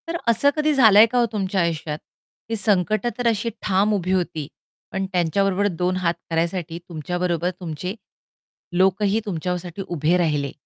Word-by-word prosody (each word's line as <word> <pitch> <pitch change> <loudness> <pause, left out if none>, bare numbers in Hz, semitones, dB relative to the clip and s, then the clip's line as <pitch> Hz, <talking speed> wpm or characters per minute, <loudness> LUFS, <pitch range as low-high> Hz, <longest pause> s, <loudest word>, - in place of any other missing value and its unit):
तर 335 +1 -2
असं 235 +5 +4
कधी 305 0 +2
झालंय 220 -5 +7
का 245 +2 0
ओ, - - +4
तुमच्या 195 -3 -1
आयुष्यात? 160 -3 -2 0.5
ती 225 - -1
संकटं 215 +2 +1
तर 245 -1 0
अशी 230 0 +1
ठाम 200 +2 +2
उभी 185 -2 -1
होती, 170 -5 -1 0.4
पण 190 0 -2
त्यांच्याबरोबर 190 +3 +1
दोन 180 +1 +1
हात 175 -2 +1 0.2
करायसाठी 165 0 -2
तुमच्या 170 +1 -4
बरोबर 175 -1 0
तुमचे 180 +2 -5 0.8
लोकही 195 +3 +3
तुमच्यासाठी 180 0 -4
उभे 170 +1 +1
राहिले. 150 -5 0
185 Hz, 150 wpm, -22 LUFS, 170-210 Hz, 0.8 s, झालंय